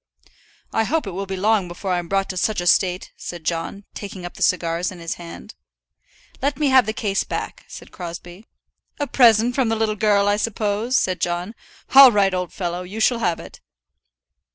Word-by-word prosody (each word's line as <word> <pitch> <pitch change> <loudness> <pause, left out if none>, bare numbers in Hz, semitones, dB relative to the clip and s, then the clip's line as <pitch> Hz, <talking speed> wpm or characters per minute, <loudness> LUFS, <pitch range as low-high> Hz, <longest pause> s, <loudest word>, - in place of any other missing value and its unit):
"I 225 - +2
hope 320 +6 0
it 195 - -5
will 195 +2 -5
be 190 0 -4
long 205 -1 +2
before 180 +2 -5
I'm 175 -1 -2
brought 195 +1 0
to - - -8
such 215 +2 0
a 175 - -3
state," 180 +1 +2
said 175 -2 -8
John, 165 +5 -3
taking 195 -3 -8
up 175 - -7
the - - -13
cigars 175 0 +1
in 185 - -10
his 165 -1 -4
hand. 170 -1 -10 0.9
"Let 280 +2 0
me 295 -2 +1
have 260 -4 +5
the - - 0
case 210 -2 -1
back," - - -6
said - - -11
Crosbie. 175 +3 -9 0.5
"A 290 - 0
present 240 -3 +4
from 255 -3 +1
the 225 - +1
little 220 -1 0
girl, 205 -1 +2
I 205 0 +2
suppose?" 215 +3 0
said 185 -2 0
John. 175 +4 -2 0.4
"All 270 -1 +10
right, 200 -3 +2
old 180 -1 -2
fellow! 175 -1 -4
you 190 +5 -7
shall 230 +2 +2
have 175 -6 0
it." - - -12
195 Hz, 200 wpm, -21 LUFS, 175-220 Hz, 0.9 s, All